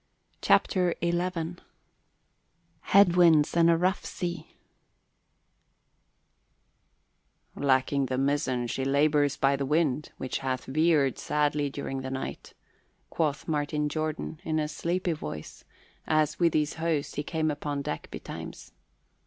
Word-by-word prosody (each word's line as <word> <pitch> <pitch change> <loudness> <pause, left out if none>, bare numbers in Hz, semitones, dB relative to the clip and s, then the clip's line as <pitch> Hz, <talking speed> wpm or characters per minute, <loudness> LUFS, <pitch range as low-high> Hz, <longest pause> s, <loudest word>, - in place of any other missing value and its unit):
CHAPTER 180 -2 +3
XI 175 0 -1 1.3
HEAD 200 -3 +5
WINDS 165 -4 +5
AND 170 0 +5
A 165 - +4
ROUGH 185 +3 0
SEA 175 -1 -5 3.0
"Lacking 135 0 +1
the 130 0 -2
mizzen 135 -2 0
she 130 +3 -3
labours 145 +1 +2
by 140 0 +3
the 140 - -2
wind, 150 0 0
which 130 - -3
hath 130 -2 -3
veered 150 -2 +2
sadly 150 -1 0
during 135 -1 -5
the 130 - -5
night," 130 0 -6 0.6
quoth 150 -3 -1
Captain 150 -1 -1
Jordan 155 +1 -3
in 155 -4 -1
a 155 -1 0
sleepy 175 +3 -1
voice, 75 - -8 0.4
as 155 -1 +1
with 170 -2 +3
his 150 -1 +1
host 155 -3 -1
he - - -1
came 155 0 -1
upon 145 -1 -3
deck 80 - -5
betimes. - - -8
150 Hz, 120 wpm, -28 LUFS, 140-165 Hz, 3.0 s, HEAD